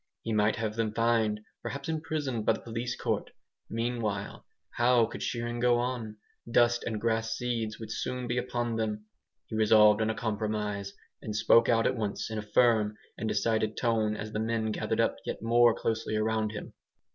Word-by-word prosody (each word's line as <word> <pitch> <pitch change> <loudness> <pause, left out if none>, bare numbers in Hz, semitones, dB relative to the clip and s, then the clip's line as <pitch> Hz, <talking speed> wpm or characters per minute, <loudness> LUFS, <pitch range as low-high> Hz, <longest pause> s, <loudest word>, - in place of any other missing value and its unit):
He 115 - -2
might 105 0 +3
have 110 -2 -3
them 110 -1 -1
fined, 115 -2 +2 0.2
perhaps 140 0 -5
imprisoned 155 -7 -2
by - - +3
the - - -7
police 120 +1 -4
court. - - -2 0.4
Meanwhile, 115 -3 -3 0.2
how 120 -1 +4
could - - -8
shearing 120 0 -2
go 120 0 +4
on? 120 -3 -3 0.3
Dust 120 0 +3
and 110 -2 -2
grass 115 0 0
seeds 115 -3 -2
would 110 -1 -7
soon 125 +2 -3
be 120 +1 0
upon 120 -2 -2
them. 105 -1 -2 0.4
He - - -7
resolved 105 -1 +6
on 110 - +1
a 110 - -1
compromise, 105 -2 -2 0.3
and 105 - -5
spoke 115 +2 +5
out 115 -1 +3
at 130 - +2
once 110 -1 -3
in 110 - -2
a - - -2
firm 105 -1 +2 0.2
and 110 - -3
decided 110 +1 0
tone 110 -3 +1
as 110 0 -6
the 105 - -2
men 110 0 0
gathered - - -2
up - - +2
yet - - -5
more 120 +1 +5
closely 110 -1 -2
around 110 0 0
him. 105 - -7
110 Hz, 180 wpm, -29 LUFS, 110-120 Hz, 0.4 s, resolved